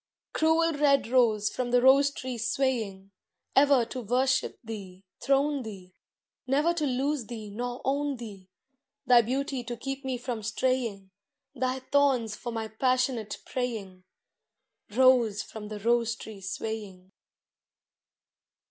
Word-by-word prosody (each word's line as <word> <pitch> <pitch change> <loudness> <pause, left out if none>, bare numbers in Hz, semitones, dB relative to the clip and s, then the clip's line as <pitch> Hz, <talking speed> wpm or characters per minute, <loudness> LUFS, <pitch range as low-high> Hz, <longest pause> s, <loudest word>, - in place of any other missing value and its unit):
Cruel 320 +1 +3
red 285 -3 +3
rose 220 -5 +3
from 250 -1 -3
the 245 0 +4
rose 270 +3 +6
tree 255 -3 -6
swaying, 220 -6 -1 0.4
Ever 275 -3 +5
to 255 +2 -6
worship 255 +4 +1
thee, 195 -4 -8 0.2
throne 280 +1 +1
thee, 190 -5 -9 0.5
Never 295 +6 +2
to 310 -4 -1
lose 265 -1 -1
thee 220 -4 -7
nor 245 +3 -4
own 280 +1 0
thee. 200 -5 -10 0.6
Thy 245 -2 +7
beauty 260 +2 -2
to 240 0 -6
keep 270 +3 -5
me 260 -1 -2
from 240 -2 -4
straying, 220 -3 -1 0.4
Thy 260 0 -2
thorns 260 -5 +2
for 240 - -6
my 225 -1 -3
passionate 250 -1 0
praying, 215 -8 -4 0.9
Rose 235 -3 +4
from 215 -1 -9
the 210 0 -6
rose 230 +1 +1
tree 220 -3 -10
swaying. 195 -1 -6
245 Hz, 130 wpm, -28 LUFS, 215-265 Hz, 0.9 s, Thy